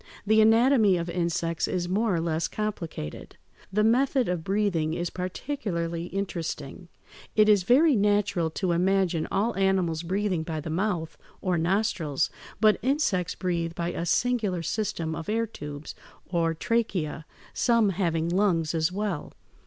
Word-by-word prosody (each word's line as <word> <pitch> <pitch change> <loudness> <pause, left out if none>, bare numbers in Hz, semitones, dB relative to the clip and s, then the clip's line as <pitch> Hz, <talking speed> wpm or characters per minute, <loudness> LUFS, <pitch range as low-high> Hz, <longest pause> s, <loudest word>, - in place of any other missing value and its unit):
The 220 +1 +5
anatomy 225 -2 +5
of 170 0 -3
insects 170 -1 -1
is 175 -1 -2
more 200 +2 +1
or - - 0
less 165 0 -1
complicated. 175 - -5 0.3
The 210 +2 +2
method 255 +3 +3
of 175 -2 -2
breathing 180 -5 0
is 175 0 -3
particularly 180 -4 -3
interesting. 175 -4 -5 0.5
It 215 -1 +5
is 210 -2 +5
very 270 - +4
natural 205 -4 +2
to 175 +3 -2
imagine 180 -1 +1
all 215 +4 0
animals 190 -4 +1
breathing 185 0 -1
by 160 -1 -4
the 155 +1 -5
mouth 175 -2 -2 0.2
or 185 -2 0
nostrils, 170 -4 0 0.3
but 215 0 +4
insects 250 - 0
breathe 170 -3 -2
by 170 0 -2
a 170 - -4
singular 210 -5 +1
system 165 -4 -2
of 165 +2 -6
air 225 +2 +1
tubes 150 -8 -8 0.3
(Fig - - -22
159), 170 - +2
or 165 0 +1 0.6
tracheæ, - - -12 0.3
some 230 -3 +3
having 170 -3 0
lungs 175 -3 +1
as 160 +1 +1
well. 195 -4 -3
180 Hz, 150 wpm, -27 LUFS, 165-210 Hz, 0.6 s, The